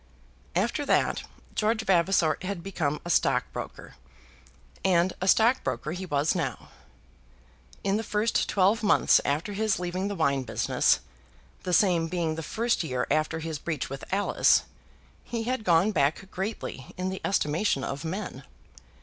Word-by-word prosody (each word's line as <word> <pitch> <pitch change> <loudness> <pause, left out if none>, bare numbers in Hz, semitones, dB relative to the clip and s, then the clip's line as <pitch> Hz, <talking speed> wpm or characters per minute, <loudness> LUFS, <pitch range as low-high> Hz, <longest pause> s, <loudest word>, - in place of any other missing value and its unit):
After 230 +10 0
that - - +2 0.3
George 220 +1 +1
Vavasor 175 -3 +3
had 185 -2 -4
become 155 -6 -2
a - - -5
stockbroker, - - -1 0.9
and 180 -1 +3
a 185 - -1
stockbroker 185 - +2
he 185 +2 -5
was 145 0 +1
now. - - -3 1.1
In 195 +1 +1
the 220 - -2
first 215 +1 0
twelve 200 +4 +3
months 210 - +4
after 155 +9 -1
his 215 0 +1
leaving 180 +2 -2
the 205 - -3
wine 140 -5 +1
business, 115 -4 +1 0.6
the 180 - -4
same 175 -2 +3
being 165 -2 -1
the 160 - -5
first 230 +5 0
year 125 -5 -1
after 155 +1 +1
his 160 -2 -4
breach 155 -6 -3
with 135 - -6
Alice, 200 +2 +3 0.6
he 230 -1 -4
had 250 -1 -2
gone 180 +2 +4
back 185 +2 0
greatly 190 - -5
in 185 +1 -2
the 190 - -5
estimation 155 -4 +1
of 140 0 -4
men. 185 +6 -5
180 Hz, 145 wpm, -27 LUFS, 155-205 Hz, 1.1 s, months